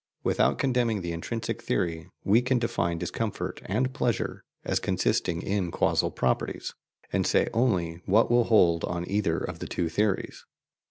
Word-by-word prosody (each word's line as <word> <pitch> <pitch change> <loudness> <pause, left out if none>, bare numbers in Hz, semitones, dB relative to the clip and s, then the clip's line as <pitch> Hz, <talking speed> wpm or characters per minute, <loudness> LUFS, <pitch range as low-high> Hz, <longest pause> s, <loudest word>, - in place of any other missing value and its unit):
Without - - +2
condemning 120 -6 +1
the 85 -1 -3
intrinsic 110 +8 -4
theory, 80 +4 -1 0.2
we 110 +5 +4
can 125 +1 +1
define 115 -8 0
discomfort 100 +5 -3
and 125 +7 0
pleasure 120 -6 -1 0.2
as - - +1
consisting 85 -1 0
in 95 -3 -1
causal - - +1
properties, 65 -1 -1 0.4
and - - +1
say - - +3
only 90 -9 +1
what 110 +5 +4
will 120 -1 +4
hold 85 -8 +4
on 85 0 -3
either 100 -5 +1
of - - -5
the - - -5
two 85 -2 -1
theories. 105 +3 -1
100 Hz, 155 wpm, -27 LUFS, 85-115 Hz, 0.4 s, we